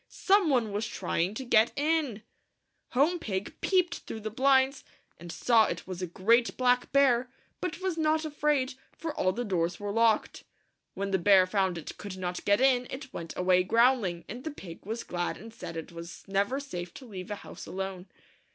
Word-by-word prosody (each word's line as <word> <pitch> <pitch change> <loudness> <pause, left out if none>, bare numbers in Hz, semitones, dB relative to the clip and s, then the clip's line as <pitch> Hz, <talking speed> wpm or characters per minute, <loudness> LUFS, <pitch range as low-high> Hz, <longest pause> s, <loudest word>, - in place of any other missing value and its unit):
Some 390 -3 +3
one 240 -6 +2
was 210 +2 -2
trying 185 -1 -1
to 265 - -5
get 225 -1 +4
in! 290 -7 0 0.7
Home 305 +8 +3
Pig 200 - -3
peeped 365 -2 +2
through 220 - -8
the 215 0 -4
blinds, 265 +2 +3 0.4
and 170 0 -8
saw 220 +7 +4
it 170 - -4
was 185 -1 -6
a 180 - -2
great 230 +7 +2
black 250 -1 +2
bear, 260 -3 +4 0.3
but 365 0 -4
was 370 -3 -1
not 315 0 +2
afraid, 295 -3 0 0.2
for 325 -2 -4
all 185 - +1
the 240 +5 -3
doors 175 -3 -1
were 205 0 -3
locked. 225 0 +2 0.5
When 200 0 -3
the 190 - +2
bear 190 +1 +6
found 190 -2 0
it 165 - -8
could 200 -2 -7
not 180 -1 -4
get 205 0 +4
in, 250 -2 +3
it 265 0 -8
went 165 -1 -7
away 180 0 +4
growling, 230 -5 +2
and 245 +4 -7
the 315 - -3
pig 190 - -10
was 225 +2 -3
glad 175 0 -3
and 225 +3 -11
said 165 -7 -7
it 160 - -6
was 170 0 -9
never 200 +7 0
safe 180 -11 -7
to 265 - -10
leave 190 -5 -8
a 205 - -2
house - - -10
alone. 190 -1 -5
220 Hz, 195 wpm, -29 LUFS, 185-265 Hz, 0.7 s, bear